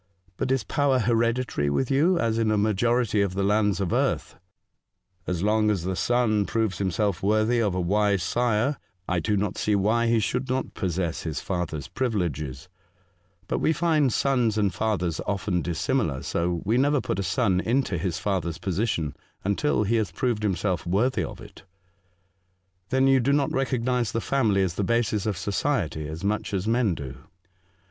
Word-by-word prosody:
But 130 - -2
is 135 -4 +1
power 140 +4 +1
hereditary 115 - +1
with 125 - 0
you, 165 +7 +3
as 115 -3 0
in 110 -1 +2
a 110 - +2
majority 110 +1 +2
of 95 -2 -1
the 100 - 0
lands 105 -1 +2
of 95 -4 -1
earth? - - 0 0.3
" - - -55
" 90 -1 -43
As 90 -1 -1
long 105 +1 +3
as 100 -6 0
the 95 +1 -2
son 110 0 +1
proves 110 -5 -1
himself 95 0 0
worthy 110 +4 +2
of 100 -5 0
a - - 0
wise 100 +1 +1
sire, 120 +5 +1 0.3
I 90 -1 +1
do 105 +5 0
not 100 -1 -2
see 105 - +1
why 110 +4 +2
he 115 0 +3
should 125 +5 -2
not 130 +1 -2
possess 90 -3 -2
his 80 -3 -3
father's 85 -6 -3
privileges; 90 - -2 0.8
but - - -1
we 160 - +2
find 155 -6 +2
sons 120 -4 +1
and 100 -4 +1
fathers 90 -5 -1
often 95 -2 -1
dissimilar, 85 - -1
so 85 0 -1
we 115 +5 +2
never 145 +1 +3
put 95 - -3
a - - +1
son 100 -3 +1
into 115 - 0
his 90 -1 -2
father's 90 -3 -2
position 90 -3 -2 0.3
until 105 +4 +1
he 115 +3 +1
has 110 -3 -1
proved 120 -4 -1
himself 95 -2 -1
worthy 105 +3 +1
of - - -7
it." - - -13 0.6
'' 90 0 -45
Then 130 +1 +3
you 135 0 +5
do 135 +3 +2
not 140 -1 +1
recognise 125 -3 0
the 115 - 0
family 110 -7 +1
as 90 -3 -1
the 100 - -2
basis 110 -2 0
of 105 -4 -1
society, 95 - -1
as 80 +3 -7
much 105 0 -1
as 95 +2 -2
men 115 -5 +2
do. 70 -4 -7
105 Hz, 185 wpm, -25 LUFS, 90-120 Hz, 0.8 s, you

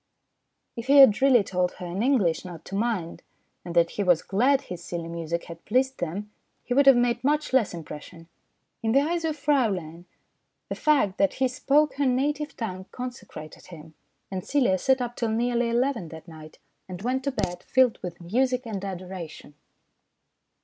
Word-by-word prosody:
If 230 +1 -7
he 280 +1 +5
had 265 -6 +8
really 260 -5 +5
told 180 -1 -1
her 180 - -9
in 175 +3 -4
English 220 - +2
not 175 -3 -10
to - - -11
mind, 200 -6 -2 0.4
and 175 -1 -7
that 170 -1 +4
he 205 - -2
was 175 -4 +3
glad 260 +8 +2
his 180 -7 -8
silly 170 -1 -5
music 170 0 -4
had 170 0 -11
pleased 260 +4 0
them, 195 +5 -4 0.3
he 245 - -2
would 275 +2 +4
have 270 - +9
made 240 0 +1
much 295 0 0
less 250 -6 +3
impression. 165 0 -10 0.5
In 225 -1 0
the 275 - +5
eyes 335 +3 -1
of 315 -1 -2
Fraulein, 200 - 0 0.6
the - - -2
fact 275 -11 +1
that 195 - +2
he 260 - +2
spoke 275 +2 +1
her 285 -1 +2
native 290 +4 -1
tongue 185 -5 -5
consecrated 245 - -9
him; 160 -3 -12 0.4
and 185 -1 -4
Celia 245 -10 +1
sat 265 +6 +2
up 240 -1 -4
till 230 - -1
nearly 240 +1 0
eleven 240 -5 0
that 160 +1 -11
night, 155 -1 -12 0.3
and 185 +1 -7
went 260 +2 -1
to 280 - 0
bed 180 -7 -3
filled 255 +1 +2
with 175 -1 -7
music 250 +8 0
and 205 -4 -5
adoration. 180 -5 -7
220 Hz, 180 wpm, -26 LUFS, 175-260 Hz, 0.6 s, have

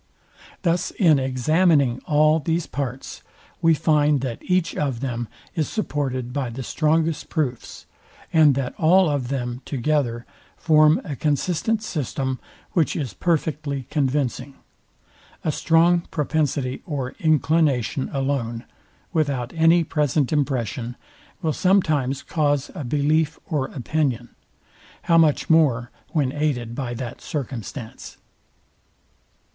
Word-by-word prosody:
Thus 175 0 +1
in 160 -8 +3
examining 135 0 +2
all 155 +1 +4
these 165 +2 -1
parts, 135 -2 -5 0.4
we 165 -1 +5
find 150 -2 +2
that 125 -4 -4
each 180 -3 0
of 135 -5 -1
them 120 -3 -3 0.3
is 155 -3 -1
supported 130 - -2
by 135 -3 -2
the 125 +3 -6
strongest 160 +2 0
proofs: 135 -7 -3 0.5
and 155 -4 +6
that 130 -2 -2
all 180 +3 +5
of 140 -4 -1
them 125 -2 -3
together 130 -4 -1 0.3
form 155 -1 +4
a 145 - -5
consistent 175 - 0
system, 135 - -3 0.3
which 165 -4 +1
is 135 - -3
perfectly 150 - -1
convincing. 140 -1 -1 0.9
A 155 - +1
strong 170 +3 +3
propensity 145 -4 -1
or 135 -5 -3
inclination 150 -5 +1
alone, 135 -4 -2 0.5
without 140 -7 -1
any 165 +1 +4
present 150 -2 0
impression, 125 -4 -1 0.5
will 160 -2 +1
sometimes 155 -9 +1
cause 145 -3 0
a 155 - -5
belief 150 +4 +1
or 145 -5 -1
opinion. 130 -3 -2 0.7
How 165 -1 +4
much 155 -3 +3
more 135 -7 +3 0.2
when 145 -6 0
aided 135 -6 -1
by 120 -1 -4
that 125 0 -6
circumstance? 125 -4 -6
145 Hz, 115 wpm, -23 LUFS, 130-160 Hz, 0.9 s, and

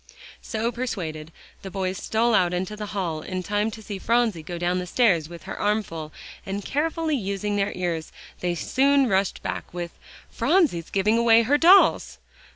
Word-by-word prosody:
So 225 0 -2
persuaded, 170 -11 -5 0.3
the 195 - -7
two - - -17
boys 190 -1 -2
stole 230 +2 +1
out 180 -4 +3
into 185 +4 -3
the 210 0 -6
hall 180 -7 -3
in 185 +2 -4
time 210 +3 0
to 220 0 -10
see 200 -2 -6
Phronsie 230 -5 +1
go 170 +3 -6
down 175 +1 0
the 180 - -5
stairs 180 -8 +2
with 170 -1 -10
her - - -6
armful, 190 -7 -2 0.3
and 200 0 -5
carefully 315 +1 -1
using 205 -2 -2
their 200 0 0
ears 170 -3 -3 0.3
they 175 -1 -1
soon 275 - +2
rushed 195 -2 0
back - - -5
with 175 -1 -5 0.4
"Phronsie's 285 - +1
giving 210 +4 +2
away 230 0 +5
her 285 +6 +2
dolls!" 370 +5 +5
200 Hz, 175 wpm, -24 LUFS, 175-230 Hz, 0.4 s, away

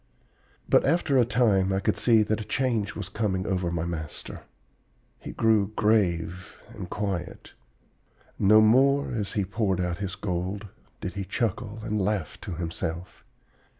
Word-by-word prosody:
"But - - +4
after 145 -3 +2
a 120 - +5
time 110 -5 +2
I 95 - +1
could - - 0
see 115 -3 +4
that 110 +1 -1
a - - -4
change 115 -5 -1
was - - -5
coming 95 -4 -1
over 90 -3 -1
my 85 -1 -2
master. 80 -4 -6 0.8
He - - -8
grew 110 -2 +2
grave 95 -4 0
and 95 -5 -7
quiet. 95 -4 -4 0.9
No, 105 +2 +6
more, 135 +6 +4
as 105 -4 -2
he 100 -3 0
poured 100 -1 -1
out 90 -1 -2
his 95 -2 -4
gold, 95 +2 -3 0.3
did 90 - -4
he 100 - -4
chuckle 110 0 -2
and 105 -2 -1
laugh 95 -5 -2
to - - -5
himself. 85 +1 -5
100 Hz, 150 wpm, -26 LUFS, 90-110 Hz, 0.9 s, No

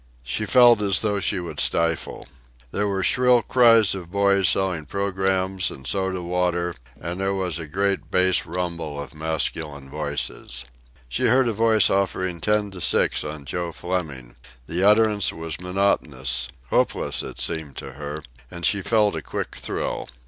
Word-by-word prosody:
She 65 - -3
felt 120 -2 +6
as 100 -2 +3
though 105 -2 0
she 95 - +1
would 85 - -6
stifle. 85 0 0 0.5
There 105 0 0
were 95 -1 -1
shrill 125 +2 +4
cries 115 -4 +5
of 90 -3 -7
boys 100 -1 +3
selling 90 -5 0
programmes 95 +1 -1
and 65 - -11
soda 95 +4 -1
water, 90 0 -1 0.3
and 85 +2 -5
there 95 0 0
was 90 -3 -1
a 80 - -6
great 100 +5 -1
bass 90 -1 +3
rumble 85 -4 -4
of 70 +2 -7
masculine 75 -3 -3
voices. 60 +1 -3 0.4
She - - 0
heard 130 -1 +4
a 115 - 0
voice 110 0 +4
offering 95 -3 -1
ten 105 0 +1
to 90 -2 -9
six - - +2
on 75 -2 -7
Joe 85 +3 -3
Fleming. 80 -9 -5 0.3
The 85 +7 -3
utterance 105 -1 +4
was 80 0 -5
monotonous 90 -9 0 0.2
hopeless, - - +1
it - - -8
seemed 80 -5 -2
to 65 - -6
her, 75 +2 -7 0.3
and 85 -1 -5
she 100 - +3
felt 105 -1 +2
a - - -3
quick - - -5
thrill. - - -3
90 Hz, 160 wpm, -23 LUFS, 80-100 Hz, 0.5 s, felt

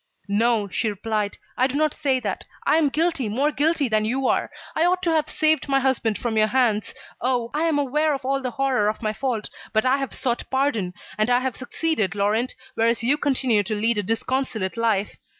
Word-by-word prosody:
"No," 215 +1 +2
she 220 +3 -1
replied, 210 0 -2 0.2
"I 255 - +3
do 270 - -5
not 305 0 +2
say 265 -3 0
that. - - -3 0.2
I 310 - +4
am 310 -3 +3
guilty, 310 -5 0
more 275 +8 +1
guilty 300 0 +1
than 215 -2 +1
you 260 +5 -1
are. - - +1 0.3
I 315 - +2
ought 365 +1 +2
to 340 - +2
have 315 -2 +1
saved 310 -1 +1
my 275 0 +3
husband 255 -5 +1
from 235 -2 -2
your 215 0 +4
hands. 225 -3 +1 0.3
Oh! 245 -1 0
I 305 +3 +1
am 320 -3 +2
aware 295 +2 +1
of 270 -1 -8
all 275 +1 0
the 255 - -2
horror 255 -5 +1
of 220 - -5
my 215 0 0
fault. 225 -1 -3 0.2
But 220 +1 +2
I 260 +2 +4
have 270 -1 -3
sought 240 -2 -2
pardon, 245 -10 0 0.2
and 215 +3 +2
I 245 0 +4
have 260 -2 -2
succeeded, 255 - -1
Laurent, 210 +5 0 0.2
whereas 230 0 +1
you 265 +5 +4
continue 260 -7 +1
to 210 +2 -3
lead 220 +1 +1
a - - +2
disconsolate 225 -1 -1
life. 220 -3 0
250 Hz, 215 wpm, -23 LUFS, 220-280 Hz, 0.3 s, I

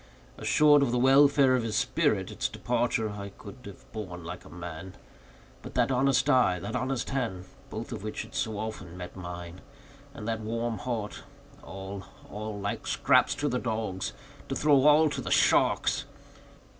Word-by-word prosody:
Assured 150 -1 +5
of 140 - +2
the 125 - +1
welfare 135 +1 +5
of 125 - +1
his 110 -2 -3
spirit, - - +1
its - - -2
departure 120 -2 0
I 100 -1 -6
could 105 +4 -11
have 100 - -11
borne 90 -6 -6
like 85 +2 -7
a - - -14
man; 90 +2 -8 0.7
but - - -10
that - - +2
honest 135 +1 +3
eye, 125 -10 +4
that 100 +6 -5
honest 130 0 -2
hand—both 110 -9 -5
of - - -5
which 110 +1 -4
had - - -14
so 120 -7 -2
often 105 -5 -6
met 90 -1 -8
mine—and 105 +10 -10
that 115 -1 -1
warm 115 0 -2
heart; 110 -2 -4 0.4
all, 95 0 -7 0.3
all—like 105 -1 -4
scraps - - +3
to 145 - -1
the 125 - 0
dogs—to 110 -6 -4
throw 145 -2 +4
all 155 +1 +6
to - - -3
the - - -5
sharks! - - +3
110 Hz, 155 wpm, -28 LUFS, 95-135 Hz, 0.7 s, all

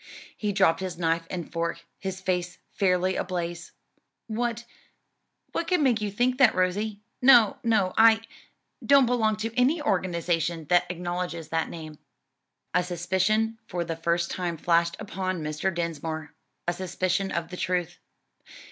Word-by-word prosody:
He 210 -1 -2
dropped 190 -4 +3
his 185 -2 -4
knife 165 -1 0
and 175 -3 -6
fork, 170 0 -2
his 190 -1 -5
face 180 -1 -1
fairly 185 -1 +1
ablaze, 175 -1 -3 0.5
"What 235 +1 -2 0.9
what 335 - -2
could 360 -3 +2
make 245 -6 +3
you 210 - -1
think 245 +5 0
that, 255 -5 +6
Rosie? 200 +3 0 0.2
No, 255 +1 +6
no, 215 -5 +2
I 225 0 +6 0.6
don't 280 -2 +6
belong 225 -3 +2
to 225 +1 -4
any 265 +7 +3
organization 170 - 0
that 180 0 +3
acknowledges 175 -2 -4
that 165 0 -1
name." 155 -2 -9 0.7
A 180 - +4
suspicion 190 +6 0
for 175 -1 -2
the 165 -1 -3
first 170 +1 0
time 175 -2 -2
flashed 170 +1 +2
upon 185 -4 -3
Mr. 155 +5 -1
Dinsmore, 160 -3 -4 0.3
a 175 - +2
suspicion 185 +1 -1
of 170 0 -2
the 180 - -7
truth. 175 -2 -2
185 Hz, 145 wpm, -26 LUFS, 170-215 Hz, 0.9 s, that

